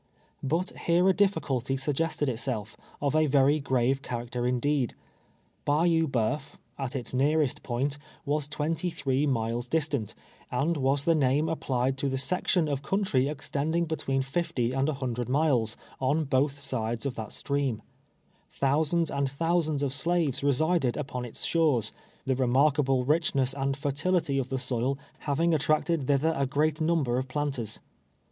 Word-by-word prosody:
But 165 +7 0 0.2
here 175 +2 +4
a - - +5
ditticulty 135 - 0
suggested 150 +2 -1
itself, 115 -3 -3 0.3
of 145 +1 +1
a 155 0 +4
very 140 +2 +4
grave 130 -1 +1
character 120 0 -3
indeed. 125 0 0 0.7
Bayou 165 +2 +3
Bceuf, 135 +2 -1 0.2
at 135 -1 -3
its 125 -1 -4
nearest 145 +1 +2
point, 135 +4 -2 0.3
was 145 0 0
twenty 155 +4 -1
three 145 -3 0
miles 120 -1 -1
distant, 140 -6 -1 0.3
and 145 +7 0
was 140 0 +1
the 165 - +5
name 145 +1 +2
applied 135 -4 -1
to 140 - 0
the 135 - -1
section 175 +3 +1
of 140 -2 -1
country 150 -6 +1
extending 155 +3 -1
between 135 -4 -1
fifty 135 -4 -1
and 135 +2 +1
a 155 - -1
hundred 125 -3 -3
miles, 130 -6 +2 0.2
on 140 +5 +1
bo\h 135 0 +1
sides 120 -4 -3
of 135 - -1
that 110 -3 -6
stream, 140 -5 -2 0.8
llionsands 155 +4 +1
and 140 -1 +1
thousands 155 0 0
of 135 -2 -1
slaves 150 -2 0
resided 145 -1 +2
upon 130 -4 -4
its 120 - -4
shores, 145 - +2 0.3
the 130 - +2
remarkable 135 +1 +3
richness 140 -3 +2
and 135 0 -1
fertility^ 145 0 0
of 130 - -7
the 135 - -1
soil 130 +1 -1 0.3
having 165 +4 +2
attracted 155 -1 +1
thither 145 +3 +2
a 140 -1 0
great 150 +3 0
number 155 -7 +2
of 130 - -4
planters. 130 -6 -3
140 Hz, 150 wpm, -28 LUFS, 130-155 Hz, 0.8 s, a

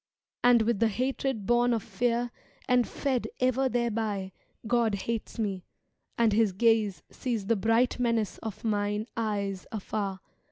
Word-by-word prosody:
And 240 -2 +6
with 225 -2 +1
the 230 - +4
hatred 255 -1 -1
bom 240 +1 +3
of 225 -3 -1
fear 240 0 0 0.4
and 250 -1 +3
fed 265 -4 -1
Ever 255 +1 +2
thereby 220 -5 -1 0.3
God 230 -2 +2
hates 225 +4 -4
me, 200 -5 -2 0.5
and 230 -2 +3
His 215 -2 +3
ga?e 225 0 +3 0.2
Sees 230 -6 -3
the 230 +3 +2
bright 225 +5 +2
menace 230 -4 0
of 220 -3 -7
mine 210 -1 0
eyes 200 -4 -2
afar. 200 -2 -3
225 Hz, 145 wpm, -28 LUFS, 205-240 Hz, 0.5 s, And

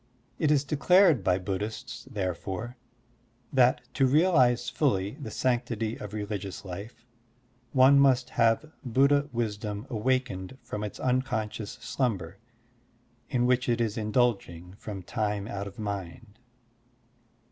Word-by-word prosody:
It 155 - +2
is 145 -2 +3
declare 180 +6 +5
by 95 -7 +1
Buddhists, 105 +6 -5
therefore, 95 +4 -4 0.8
that 130 0 +4
to 135 -2 +3
realize 130 -5 +3
ftilly 115 -2 0
the 115 - -5
sanctity 115 -1 -1
of 105 - -8
religious 105 -3 -5
life 105 +6 -8 0.7
one 135 +1 +6
must 130 -2 +3
have 115 +7 +2
Buddha 140 +3 +3
wisdom 105 -2 -3
awakened 125 -2 -1
from 105 - -5
its 105 - -6
unconscious 110 -5 -1
sltmiber 100 -8 -2 0.9
in 125 -2 +1
which 125 0 +2
it 120 0 +2
is 115 -3 0
indulging 105 -6 0
from 100 -4 -7
time 105 0 -2
out 100 -2 -4
of 100 - -11
mind. 100 0 -6
115 Hz, 120 wpm, -28 LUFS, 100-130 Hz, 0.9 s, one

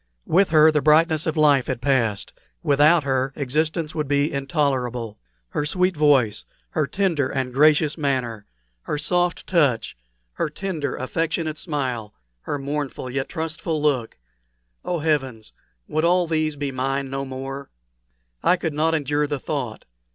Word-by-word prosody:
With 190 +4 +3
her 155 0 +6
the 150 -1 +1
brightness 155 +1 +4
of 160 0 -1
life 145 -4 +4
had 130 -3 -2
passed; 120 -6 0 0.3
without 150 +3 +4
her 135 0 0
existence 155 +3 -1
would 150 -2 -2
be 145 +1 +1
intolerable. 130 -6 -1 0.3
Her 150 - -2
sweet 180 +4 +1
voice, 135 -8 +3 0.3
her 155 -3 0
tender 170 -9 0
and 130 -2 -2
gracious 150 +2 +4
manner, 125 -7 -2 0.3
her 150 - -3
soft 175 +3 0
touch, 140 -11 +1 0.4
her - - -2
tender, 160 -3 -3
affectionate 160 +3 -2
smile, 130 - -3 0.3
her 145 - -3
mournful 140 -2 -4
yet 135 +1 -2
trustful 160 0 -3
look 140 -6 0 0.7
oh, 175 - -1
heavens! 135 -8 -1 0.3
would 155 +1 -1
all 175 +1 +3
these 155 -2 0
be 140 -1 -3
mine 135 +1 -2
no 135 0 -2
more? 135 +1 -6 0.7
I - - +4
could 165 -3 -3
not 160 +2 +1
endure 150 0 0
the 145 -1 -3
thought. 130 -6 -4
145 Hz, 145 wpm, -23 LUFS, 135-155 Hz, 0.7 s, her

